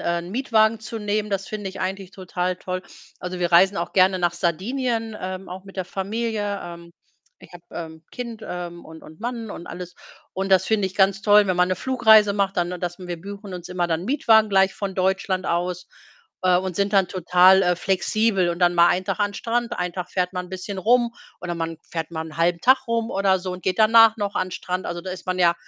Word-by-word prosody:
äh, 170 0 -1
Mietwagen 220 +2 +1
zu 225 +1 -6
nehmen. 210 0 -2
Das 195 -1 -2
finde 205 -2 -5
ich 190 - -9
eigentlich 190 0 -4
total 185 -1 -3
toll. 185 0 -5 0.4
Also, 180 0 -5
wir 175 -1 -1
reisen 190 +4 +5
auch 170 -1 -3
gerne 185 0 +4
nach 175 -1 +1
Sardinien, 225 - -2
ähm, 185 +1 -6
auch 185 +2 -8
mit 195 - -14
der 185 - -2
Familie. 205 +2 -3
Ähm, 170 0 -10 0.5
ich - - -17
habe, 175 -1 -12
ähm, 160 -1 -8
Kind, 235 -3 -7
ähm, 175 -1 -6
und 160 0 -12
und 155 +4 -14
Mann 230 -2 -4
und 170 - -8
alles. 180 0 -8 0.4
Und 190 +1 -3
das 190 -1 +5
finde 215 -3 +1
ich 190 - -8
ganz 195 0 +3
toll, 205 0 +5
wenn 185 -2 0
man 180 0 +3
'ne 185 - 0
Flugreise 220 -4 +5
macht, 200 -1 -1
dann 175 0 0
das 175 -1 -4
wir 175 -3 -6
buchen 200 0 -8
uns 180 -1 -8
immer 180 -1 -1
dann 165 +1 -2
Mietwagen 220 -4 +4
gleich 195 0 +3
von 195 -2 -4
Deutschland 190 0 0
aus, 180 +1 -2 0.6
äh, 180 -1 +5
und 185 0 -2
sind 200 +1 0
dann 195 -2 +4
total, 185 +1 +5
äh, 180 -1 +2
flexibel, 195 +1 +1
und 170 - -4
dann 175 0 +4
mal 170 0 +6
ein 185 - 0
Tag - - -2
an 205 0 +1
Strand, 235 +2 -2
ein 180 -1 -2
Tag 180 0 -6
fährt 180 0 -1
man 180 -1 -4
'n - - -16
bisschen 190 +1 -6
rum 235 +4 +2 0.3
oder 175 -1 -4
man 165 0 -4
fährt 165 -1 -4
mal 160 -1 -3
'n 155 - -11
halben 170 +1 +1
Tag 260 +1 +4
rum 230 0 -1
oder 195 -1 +2
so 185 0 -4
und 180 0 -8
geht 185 - 0
danach 225 0 +6
noch 205 -2 -3
an 185 - -1
Strand. 185 +1 -4
Also, 175 0 -4
da 185 +2 -7
ist 185 0 -8
man 185 0 -2
ja 170 -1 +4
190 Hz, 230 wpm, -23 LUFS, 180-210 Hz, 0.6 s, mal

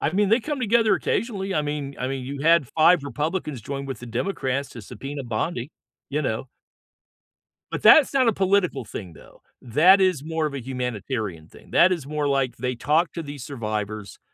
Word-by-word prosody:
I 155 - 0
mean, 200 +1 +2
they 225 +3 +4
come 290 +1 -4
together 225 -1 +3
occasionally. 195 -5 -2
I 150 - +1
mean 145 -2 -4
I 125 - -2
mean, 135 -2 -4
you 140 +1 -6
had 165 -4 +4
5 165 0 +4
Republicans 150 -2 -3
join 140 +3 -5
with 135 -5 -5
the 120 - -8
Democrats 130 - -2
to 115 - -10
subpoena 140 +6 -7
Bondi. 120 +4 -3 0.4
You 150 +2 -1
know? 125 0 -3 1.2
But - - -3
that's 295 -3 +7
not 260 -3 +3
a 225 - +4
political 190 -8 +1
thing, 95 -6 -8
though. - - -17 0.2
That 175 - +5
is 180 -7 +1
more 160 -1 -1
of 145 - -3
a 140 - -4
humanitarian 120 - -4
thing. - - -18
That 185 +2 +5
is 155 -6 -5
more 150 0 -2
like 135 -3 0
they 125 -1 -2
talk 155 +8 +1
to 165 - -5
these 145 -3 -8
survivors, 110 -5 -5
145 Hz, 195 wpm, -24 LUFS, 125-175 Hz, 1.2 s, that's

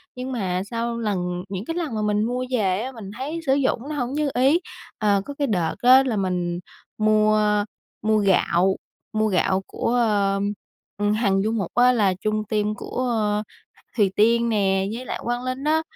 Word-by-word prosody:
nhưng 255 +1 -5
mà 185 -7 -1
sau 235 +2 -3
lần 180 -5 -2
những 195 +1 -5
cái 330 - -4
lần 325 -9 -3
mà 215 - -1
mình 210 0 +1
mua 250 +3 -1
về 195 -6 +1
á, 255 +3 -4
mình 220 -6 -9
thấy 295 +6 -4
sử 270 - +3
dụng 275 -3 +1
nó 305 - -3
hổng 250 -2 -2
như 300 0 0
ý, 270 +7 +4 0.4
ờ, 205 -2 +2
có 285 - -6
cái 280 0 -1
đợt 175 -8 0
á 255 +2 +7
là 245 -5 -1
mình 180 -2 -1 0.4
mua 215 0 +3 0.6
mua 215 +1 +2
gạo 190 -2 +3 0.4
mua 215 0 +2
gạo 190 -1 +1
của 235 - -2
ờ, 205 -4 +2 0.6
ừm, 205 0 +1
Hằng 200 -3 +2
Du 220 - 0
Mục 205 -6 -2
á 245 +1 +6
là 205 -6 +2
chung 215 0 0
team 210 -1 0
của 250 +4 -3 0.9
Thùy 200 -4 +3
Tiên 235 +2 +3
nè 195 -3 +1
với 245 +3 -6
lại - - -4
Quang 240 +1 -2
Linh 255 +1 -3
á, 310 +2 +2
215 Hz, 190 wpm, -23 LUFS, 195-250 Hz, 0.9 s, á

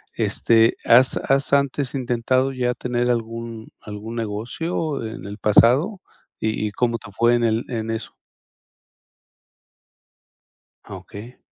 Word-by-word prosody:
Este, 115 0 +3
¿has 125 +3 +5
has 135 +1 0
antes 140 -1 +1
intentado 130 +1 0
ya 125 -1 0
tener 125 0 -1
algún 115 -1 -5
algún 105 +2 -8
negocio 120 +7 -3
en 110 - -7
el 100 +1 -7
pasado? 135 - +4 0.4
¿Y 110 -1 -1
y - - -5
cómo 115 +2 0
te 100 - -12
fue 120 +3 +3
en 120 - 0
el 110 +1 +1
en 115 -2 -3
eso? 110 - -6 2.7
Ah, - - -9
okey. 115 +5 -12
120 Hz, 125 wpm, -22 LUFS, 110-130 Hz, 2.7 s, has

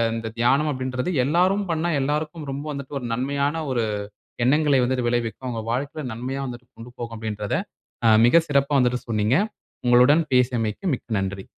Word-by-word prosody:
இந்த 115 0 -4
தியானம் 135 +6 +3
அப்டின்றது 130 +2 -3
எல்லாரும் 185 +8 +2
பண்ணா 165 +1 0
எல்லாருக்கும் 150 +2 -2
ரொம்ப 140 +1 -4
வந்துவட்டு 140 0 -5
ஒரு 125 - -5
நன்மையான 140 +5 -1
ஒரு 120 -3 +1 0.6
எண்ணங்களை 145 +1 +3
வந்துட்டு 125 -1 0
விளைவிக்கும். 120 +1 -2
அவங்க 115 -2 -3
வாழ்க்கையில 145 +5 -3
நன்மையா 130 +4 -4
வந்து 120 -2 -7 0.2
கொண்டு 115 +2 -11
போகும், 115 -1 -5
அப்டின்கிறத 105 -2 -2 0.7
மிக 165 +8 +6
சிறப்பா 140 0 +2
வந்துட்டு 125 -1 +1
சொன்னீங்க. 110 +3 +2 0.5
உங்களுடன் 125 +7 +5
பேசியமைக்கு 120 - +1
மிக்க 125 - -10
நன்றி. 95 0 -4
130 Hz, 150 wpm, -23 LUFS, 120-145 Hz, 0.7 s, மிக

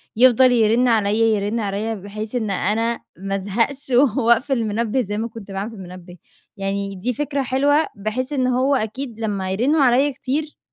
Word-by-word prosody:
يفضل 255 +2 +6
يرنّ 235 +1 +3
عليَّا، 220 -1 +2
يرنّ 205 +4 -2
عليَّا 210 +2 -2
بحيث 210 +3 -7
إن 220 -4 -1
أنا 225 +5 0 0.2
ما 195 +2 -3
أزهقش 230 +8 -2 0.3
وأقفل 235 +2 +3
المنبِّه 230 +2 0
زي 205 -2 -4
ما 225 +2 -2
كنت 220 -3 -11
باعمل 195 +3 -4
في - - -11
المنبِّه، 180 -1 -11 0.4
يعني 195 0 -3
دي 225 +7 -2
فكرة 285 +2 -2
حلوة 285 +5 +2
بحيث 220 +7 -3
إن 260 -3 +1
هو 255 +3 +2
أكيد 230 0 -4
لما 200 -4 -2
يرنّوا 265 +10 +2
عليَّا 265 +2 +4
كتير 290 +4 -3
225 Hz, 170 wpm, -21 LUFS, 200-255 Hz, 0.4 s, يفضل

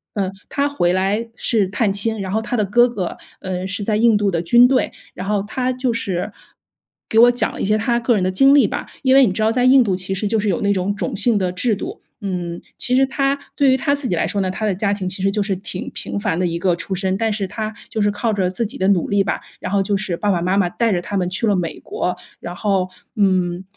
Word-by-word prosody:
嗯， 195 -3 0 0.2
他 285 0 0
回 175 -12 +1
来 200 +5 0
是 210 -5 +1
探 205 0 0
亲， 220 +2 0
然 190 -1 -4
后 220 - 0
他 245 +2 -3
的 210 - +1
哥 240 +5 +4
哥， 195 -7 -4 0.3
嗯， 185 -1 -3
是 200 +1 -3
在 210 +1 0
印 225 0 +4
度 205 -1 +1
的 170 - 0
军 240 +8 +6
队， 260 0 +1 0.2
然 185 - -6
后 205 -2 +1
他 255 +4 -1
就 255 -1 -1
是 195 -6 -2 0.7
给 225 - -1
我 245 +1 +8
讲 245 - -1
了 - - -6
一 - - 0
些 210 +2 +2
他 235 +2 +1
个 235 0 +2
人 190 - 0
的 185 - +1
经 270 +8 +5
历 285 - +5
吧。 - - -4 0.2
因 260 0 +4
为 270 -1 +7
你 195 - +1
知 205 - -3
道 220 +1 +3
在 245 +2 +1
印 255 +1 +6
度 195 -5 0
其 185 +1 -3
实 195 +2 -2
就 220 +2 +1
是 205 0 0
有 180 - 0
那 200 0 +2
种 190 +2 -1
种 - - -3
姓 215 +2 +1
的 185 -2 0
制 215 +5 0
度， 375 - -7 0.2
嗯。 180 -4 -4 0.2
其 250 - 0
实 270 +1 +5
他 275 +1 0 0.2
对 275 -2 +4
于 260 - +3
他 280 +2 +1
自 280 -3 -4
己 180 - +1
来 - - 0
说 200 - -1
呢， 185 - -1
他 215 +3 -3
的 205 - +1
家 200 +2 0
庭 195 -2 -3
其 185 +1 -4
实 195 - +2
就 210 - 0
是 195 -2 -1
挺 185 -1 -6
平 - - -3
凡 205 -5 -1
的 185 - +1
一 170 0 -2
个 180 -1 +2
出 180 +3 -5
身， 190 0 -1
但 225 0 0
是 205 -2 -2
他 215 +2 -4 0.2
就 220 - -2
是 205 - +3
靠 220 +2 -1
着 190 -3 0
自 230 +5 -2
己 245 +7 -6
的 190 - +1
努 185 -4 +2
力 200 -1 +3
吧， - - -2 0.2
然 185 - -4
后 200 -1 +2
就 200 +1 0
是 195 -3 -2
爸 205 -1 0
爸 175 - 0
妈 185 +3 +1
妈 195 -3 +3
带 230 +5 0
着 175 -3 0
他 200 - -5
们 180 -2 0
去 225 +5 0
了 205 - +3
美 170 -3 -3
国。 180 0 -3 0.2
然 175 +1 -6
后， 190 -1 0 0.3
嗯， 185 -3 +1
205 Hz, 300 characters per minute, -20 LUFS, 185-230 Hz, 0.7 s, 我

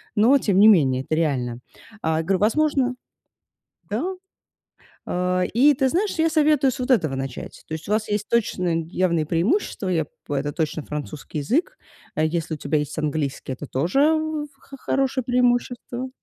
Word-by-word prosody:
но 235 +7 +5
тем 200 -5 +1
не 215 - +8
менее, 135 -11 +5
это 155 - -1
реально. 125 -7 -1 0.4
А, 160 0 0
я - - -1
говорю, 185 +2 +1
возможно 255 +2 +2 1.0
Да, 375 +1 -2 0.9
э, 180 0 0
и 285 +5 +6
ты 265 -1 +2
знаешь, 395 +7 0
я 325 0 +4
советую 300 -3 +3
с 260 - -7
вот 255 +1 -1
этого 155 - +2
начать. 135 -1 -6
То - - -5
есть 160 +3 -6
у - - -1
вас 215 0 0
есть 210 0 -1
точно 180 -7 +1
явные 170 -3 0
преимущества, 195 - 0
я 165 -4 +1
б - - -31 0.3
это 145 +2 -1
точно 155 -1 -2
французский 150 +1 -6
язык. 315 - 0 0.4
Э, 155 - +2
если 160 0 -2
у - - -9
тебя 150 +2 0
есть 150 +1 -5
английский, 145 -3 -2
это 145 - -7
тоже 165 - 0
в 315 -1 -1
х - - -24
х 275 - -8
хорошее 265 -1 0
преимущество. 245 0 0
185 Hz, 175 wpm, -23 LUFS, 155-260 Hz, 1.0 s, не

